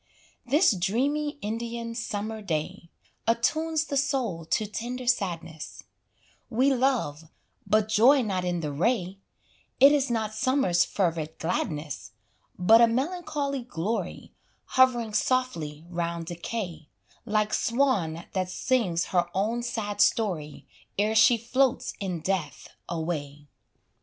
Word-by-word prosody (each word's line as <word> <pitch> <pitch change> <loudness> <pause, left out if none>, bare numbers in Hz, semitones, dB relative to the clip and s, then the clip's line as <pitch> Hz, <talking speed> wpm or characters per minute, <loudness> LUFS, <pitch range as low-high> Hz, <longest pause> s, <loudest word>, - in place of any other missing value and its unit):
This 295 +7 +5
dreamy 275 - 0
Indian 230 +2 -4
summer 220 -1 -4
day, 170 -1 -3 0.4
Attunes 315 +7 +1
the 285 -3 -2
soul 255 - -1
to 215 - 0
tender 240 +4 -5
sadness; 175 - -2 0.7
We 260 +4 +3
love 240 - 0 0.4
but 215 0 +3
joy 245 +6 +5
not 190 -4 -1
in 175 -1 -1
the 150 -2 -3
ray 185 - 0 0.6
It 275 +2 +9
is 280 -2 +2
not 220 -2 -1
summer's 220 -7 +2
fervid 165 -4 -1
gladness, 155 -3 -3 0.4
But 220 +6 +6
a 235 - +7
melancholy 280 +1 -2
glory, 205 -3 -4 0.4
Hovering 245 -4 +4
softly 170 - -1
round 170 -1 -3
decay, 170 -2 -5 0.4
Like 210 0 0
swan 220 -11 +1
that 185 -1 -1
sings 185 -6 0
her 175 -1 +3
own 220 +5 0
sad 210 -4 -2
story, 165 -10 +1 0.3
Ere 210 +2 +2
she 225 +2 +6
floats 255 +3 +1
in 185 -5 -3
death 165 -5 -3 0.2
away. 150 -4 -4
215 Hz, 115 wpm, -27 LUFS, 175-250 Hz, 0.7 s, It